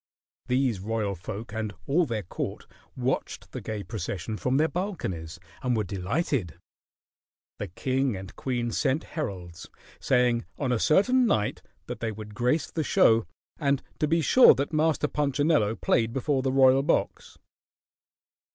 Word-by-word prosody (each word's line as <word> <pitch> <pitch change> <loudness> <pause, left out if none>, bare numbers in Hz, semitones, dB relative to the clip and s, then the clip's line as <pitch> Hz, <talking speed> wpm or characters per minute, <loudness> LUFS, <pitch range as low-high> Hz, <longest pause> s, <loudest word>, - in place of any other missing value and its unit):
These 125 -4 +1
royal 105 0 -2
folk 100 +5 -7
and 110 -2 -3
all 160 +4 +2
their 110 -4 -2
court 85 - -5 0.3
watched - - -2
the - - -6
gay 105 -2 -4
procession 105 0 -4
from 125 +4 0
their 155 +2 +3
balconies 95 - -4 0.2
and 125 -2 0
were 110 - +1
delighted. 100 - -2 1.0
The 105 - -3
king 130 +6 -1
and 95 -1 -9
queen 120 -3 -2
sent 140 +5 0
heralds, 90 - -5 0.3
saying 125 -2 +2
on 135 -3 -1
a 120 - +1
certain 245 - +4
night 105 - 0 0.2
that - - -6
they 115 -1 -2
would 105 0 -9
grace 125 +8 0
the 160 - -1
show 115 - +4 0.3
and 140 -3 +1 0.2
to 150 - +2
be 165 +2 +2
sure 255 - +7
that 140 +4 -2
Master 155 -1 +2
Punchinello 145 -6 +1
played 115 0 +1
before 135 +1 0
the 130 0 0
royal 135 0 +5
box. 150 +5 -1
125 Hz, 150 wpm, -27 LUFS, 105-145 Hz, 1.0 s, sure